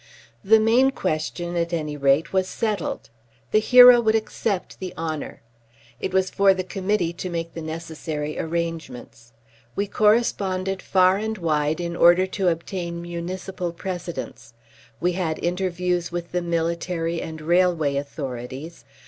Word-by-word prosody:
The 220 +3 +6
main 235 +5 +4
question, 175 -5 -3
at 170 0 -1
any 150 -3 -2
rate, 140 +4 +2
was 190 -1 +2
settled. 210 - -3 0.4
The 215 - +5
hero 245 +1 +8
would 220 -1 +2
accept 215 -3 -2
the 185 -1 -6
honour. 160 -6 -5 0.6
It - - -3
was 190 0 +1
for 195 -1 +4
the 185 - -2
Committee 185 -2 -1
to 180 +1 -5
make 165 -1 -4
the 165 - -6
necessary 160 -1 -5
arrangements. 155 -8 -5 0.4
We 200 - 0
corresponded 195 -3 +1
far 185 0 +3
and 220 +1 -3
wide 155 -2 0
in 170 -1 -3
order 175 +2 +6
to 190 0 -2
obtain 170 0 -2
municipal 175 +1 -5
precedents. 170 -10 -6 0.4
We 180 - +1
had 170 -3 -2
interviews 180 -1 -1
with 175 0 -5
the 180 - 0
military 170 0 -2
and 160 0 -6
railway 170 -3 +2
authorities. 140 +2 -6
175 Hz, 140 wpm, -23 LUFS, 160-190 Hz, 0.6 s, hero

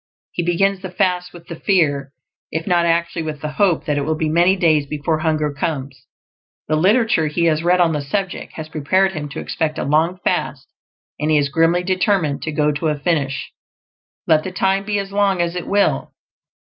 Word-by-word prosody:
He - - -2
begins 185 +3 +1
the 190 - -6
fast 180 0 0
with 170 -1 -13
the 170 - -8
FEAR 145 -8 +1 0.4
if 160 +1 -3
not 175 -2 +2
actually 170 0 0
with 155 -2 -5
the 150 - -4
hope 180 0 +1
that 145 -1 0
it - - -1
will 155 +3 -1
be 155 -1 -1
many 175 +4 +4
days 155 -6 +2
before 150 +2 -1
hunger 155 -2 0
comes; 135 -3 -4 0.6
the 155 - +1
literature 200 0 +3
he 170 +3 0
has 155 -1 +2
read 180 +2 +3
on 170 -2 +3
the 150 - -1
subject 190 +6 -3
has 160 -1 -7
prepared 185 +6 +1
him 150 -5 -5
to - - -6
expect 155 -1 -2
a - - -2
long 160 +6 +1
fast, - - -1 0.5
and 150 +1 -1
he 155 - +4
is 145 -1 +1
grimly 165 +4 +2
determined 185 -5 +1
to 155 - -3
go 150 0 +1
to 150 +2 -2
a 150 -1 0
finish, 145 -3 -1 0.7
let 155 -1 +3
the 185 - -5
time 195 +1 0
be 210 0 -1
as 195 0 -4
long 200 -2 +1
as 170 0 0
it 180 - -4
will. 200 0 +1
165 Hz, 205 wpm, -19 LUFS, 150-185 Hz, 0.7 s, many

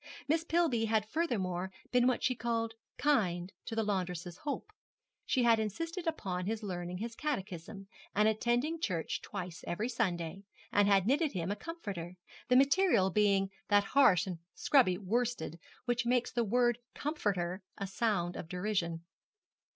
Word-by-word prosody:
Miss 320 +2 +2
Pillby 325 -9 +2
had 220 -1 +1
furthermore 190 - -1 0.2
been 250 0 +4
what 255 - +1
she 255 - +3
called 230 -2 -1 0.2
'kind' 190 -10 +1
to 225 - -4
the 225 - +1
laundress's 180 -4 -2
hope. 300 +7 -4 0.6
She 255 - +2
had 230 -1 +5
insisted 330 - -3
upon 185 - -2
his 220 0 -2
learning 180 -2 -4
his 230 +4 -4
catechism, 195 - -4 0.3
and 210 +1 +4
attending 240 +9 +1
church 170 - -1
twice 180 -4 -6
every 210 +8 -1
Sunday, 185 -7 -1 0.3
and 205 0 +4
she - - +3
had 195 -2 +5
knitted 285 +5 +2
him 180 0 -2
a - - 0
comforter, 200 - -6 0.3
the 250 - +4
material 275 - +4
being 195 -1 +3 0.2
that 205 -1 +5
harsh 200 -7 +5
and 180 -3 -5 0.2
scrubby 235 -11 +4
worsted 210 -4 -1 0.3
which 240 0 0
makes 245 0 +2
the 240 - +1
word 240 +2 +2 0.2
comforter 200 - -1 0.2
a 200 - -3
sound 195 -4 0
of 160 - -6
derision. 180 -3 -1
210 Hz, 155 wpm, -33 LUFS, 185-245 Hz, 0.6 s, had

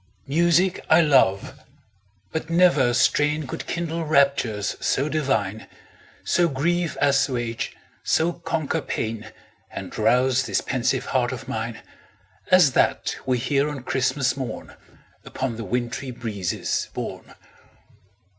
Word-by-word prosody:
Music 170 +5 +2
I 160 +2 +7
love 130 - +2 0.7
but 160 - -4
never 165 -7 +4
strain 150 +4 +2
Could 130 - -6
kindle 170 -1 -3
raptures 140 -9 +1
so 140 - 0
divine, 110 -9 -1 0.6
So 175 -1 +2
grief 170 +4 -1
assuage, 130 -5 0 0.3
so 170 +2 +1
conquer 165 -3 -2
pain, 110 -1 -4 0.4
And - - -8
rouse 130 +1 +2
this - - +1
pensive 130 -3 -1
heart 125 -2 0
of 130 +1 -7
mine 115 +1 -4 0.7
As 185 -6 +6
that - - +1
we 130 -1 +2
hear 140 +4 +1
on 140 -4 -6
Christmas 130 0 0
morn, 130 -3 -6 0.5
Upon 130 -4 -4
the 115 - -5
wintry 125 +3 -3
breezes 110 -7 -3
borne. - - -6
135 Hz, 115 wpm, -23 LUFS, 120-155 Hz, 0.7 s, I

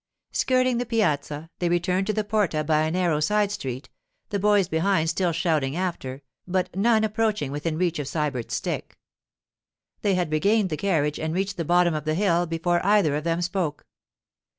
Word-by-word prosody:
Skirting 255 -2 +2
the 245 - -1
piazza, 155 - -1
they 175 - 0
returned 180 +2 +1
to 215 - +1
the 215 - 0
porta 205 -7 0
by 155 0 +2
a - - 0
narrow 170 -3 +1
side 205 +6 +1
street, 135 -10 -5 0.4
the 205 -2 -1
boys 205 -2 +3
behind 165 0 +1
still 175 +1 0
shouting 155 -4 0
after, 145 -7 -4 0.2
but 185 0 -1
none 220 +2 +3
approaching 215 - 0
within 155 +2 -2
reach 175 -2 0
of 145 - -3
Sybert's 145 -7 -2
stick. - - -4 1.0
They 200 -2 +2
had 180 -4 -1
regained 195 +5 +2
the - - 0
carriage 150 -5 0
and 160 +1 -2
reached 195 0 -1
the 170 - -2
bottom 175 +1 +3
of 155 -1 -3
the 155 0 0
hill 175 -2 +2
before 170 +1 0
either 195 -7 +3
of 150 +2 -3
them 170 +1 0
spoke. 175 -4 -2
175 Hz, 180 wpm, -25 LUFS, 155-200 Hz, 1.0 s, boys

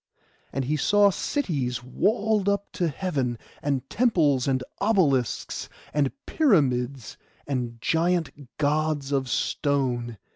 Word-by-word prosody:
And 135 -1 -2
he 150 +4 0
saw 205 +5 +4
cities 140 - -2
walled 205 - +1
up 200 0 -1
to 175 - 0
heaven, 140 -7 -2 0.2
and 135 -2 -1
temples, 155 - +2
and 130 -1 +1 0.2
obelisks, 165 - +1 0.2
and 145 -2 +2
pyramids, 135 - +1 0.3
and 120 -4 -3
giant 165 +1 +1 0.3
Gods 150 -1 0
of 135 -2 0
stone. 125 -5 0
145 Hz, 110 wpm, -26 LUFS, 130-185 Hz, 0.3 s, saw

